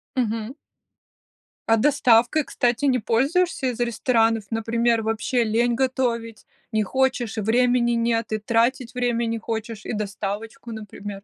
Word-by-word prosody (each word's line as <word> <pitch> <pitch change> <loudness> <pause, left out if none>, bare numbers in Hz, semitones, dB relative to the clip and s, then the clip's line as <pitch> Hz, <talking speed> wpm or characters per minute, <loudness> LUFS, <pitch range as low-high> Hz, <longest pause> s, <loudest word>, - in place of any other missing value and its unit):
Мгм. 230 0 -2 1.1
А 225 - +6
доставкой, 255 +2 +3
кстати, 245 +3 0
не 260 -2 +3
пользуешься 275 - +1
из 245 -2 -3
ресторанов? 225 -2 +1
Например, 230 +1 +1
вообще 225 +3 0
лень 235 +2 +1
готовить, 235 -4 -1 0.3
не 220 - +1
хочешь, 255 0 0
времени 240 +3 +2
нет, 230 -1 0
и 215 - +1
тратить 235 +3 0
время 240 -1 0
не 230 0 -1
хочешь, 220 -1 -5
и - - -4
доставочку, 215 +3 -5
например? 205 -2 -8
230 Hz, 130 wpm, -23 LUFS, 220-250 Hz, 1.1 s, А